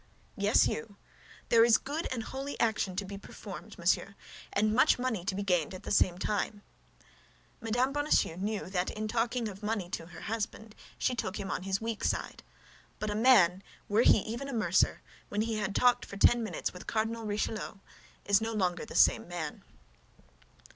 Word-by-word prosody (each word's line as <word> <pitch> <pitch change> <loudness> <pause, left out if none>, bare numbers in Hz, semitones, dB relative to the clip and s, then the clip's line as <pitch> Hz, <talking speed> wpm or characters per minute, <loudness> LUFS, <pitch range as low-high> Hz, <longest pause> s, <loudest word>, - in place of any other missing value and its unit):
"Yes, 205 -1 +4
you. 225 -3 -5 0.5
There 230 -1 +6
is 230 -1 +6
good 295 +5 -4
and 240 -3 -2
holy 270 +4 -6
action 210 -5 +1
to 200 +2 -2
be 195 +1 -7
performed, - - -10
monsieur, - - +1 0.4
and 215 +1 +2
much 250 - +5
money 245 -7 -2
to 195 -1 -1
be 200 - -2
gained 180 -3 +1
at 185 - -10
the - - -5
same 180 -3 +3
time." 205 +1 -2 1.0
Mme. 245 +4 +1
Bonacieux 290 - +2
knew 205 +1 -3
that 180 -1 -1
in 215 0 -4
talking 235 +1 0
of 200 -1 -8
money 210 -4 -2
to 165 -4 -4
her 175 -2 -11
husband, 220 0 -4 0.2
she 255 - +1
took 210 -5 -3
him 195 -1 -4
on - - -2
his 195 +1 -1
weak 225 -1 -3
side. - - -2 0.6
But 215 0 -3
a - - -2
man, 205 -6 +5 0.3
were 210 +3 +3
he 220 - +6
even 235 +7 -5
a - - -5
mercer, 200 -5 +2 0.3
when 205 - -1
he 225 0 -1
had 205 -2 -2
talked 245 -1 +4
for 200 - -8
ten 240 +4 +5
minutes 220 - -3
with 180 - -11
Cardinal 225 0 -1
Richelieu, 215 +1 -2 0.5
is 200 +1 +4
no 225 0 -2
longer 180 -4 0
the - - -10
same - - +4
man. 170 -3 -5
215 Hz, 185 wpm, -30 LUFS, 195-230 Hz, 1.0 s, There